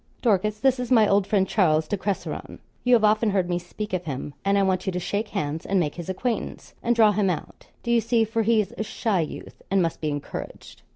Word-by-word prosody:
'Dorcas, 210 -2 +2
this 265 0 +2
is 250 - -3
my 225 -5 +5
old 200 -1 +2
friend, 195 -3 +2
Charles 160 -6 +2
de 205 - 0
Cresseron. 200 0 -4 0.3
You 250 0 +5
have 225 - +2
often 215 +1 +4
heard 190 -3 +1
me 175 0 -1
speak 185 +4 -7
of 180 -1 -1
him; 140 0 -5
and 200 0 +2
I 200 - +3
want 185 -1 0
you - - +2
to 180 - -2
shake 205 +4 -2
hands 160 -7 -3
and 195 -1 +1
make 150 -4 0
his 175 0 -7
acquaintance, 225 +4 -3
and 240 0 +1
draw 220 -2 +6
him 205 -1 +1
out 175 - -5 0.2
do 235 - -1
you 235 -1 +4
see; 230 0 +2
for 225 +1 -1
he's 220 -2 +2
a - - +1
shy 215 -2 -1
youth, 155 - -7
and 195 - +2
must 165 -3 -1
be 155 - -1
encouraged.' 145 -1 -7
200 Hz, 240 wpm, -25 LUFS, 180-220 Hz, 0.3 s, draw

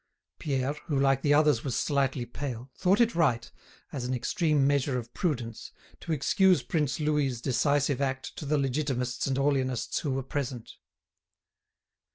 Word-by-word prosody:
Pierre, 135 -1 -1
who 145 -4 0
like 135 -1 +3
the 145 0 +3
others 150 -5 +3
was 130 -4 -2
slightly 135 -3 0
pale, 125 0 -6
thought 185 +3 +2
it 235 -1 +4
right, 125 -9 +1 0.4
as 135 - -3
an 125 +1 -1
extreme 150 - +1
measure 140 -2 +1
of 120 -1 -7
prudence, 120 - -3 0.3
to - - -6
excuse 180 +5 +3
Prince 150 -4 -1
Louis's 150 -5 0
decisive 140 +2 +1
act 130 -1 -2
to 150 - -6
the 150 +1 +2
Legitimists 130 -2 -1
and 135 -1 0
Orleanists 135 -4 0
who 150 - -3
were 135 0 -2
present. 130 -3 -4
140 Hz, 155 wpm, -28 LUFS, 125-150 Hz, 0.4 s, it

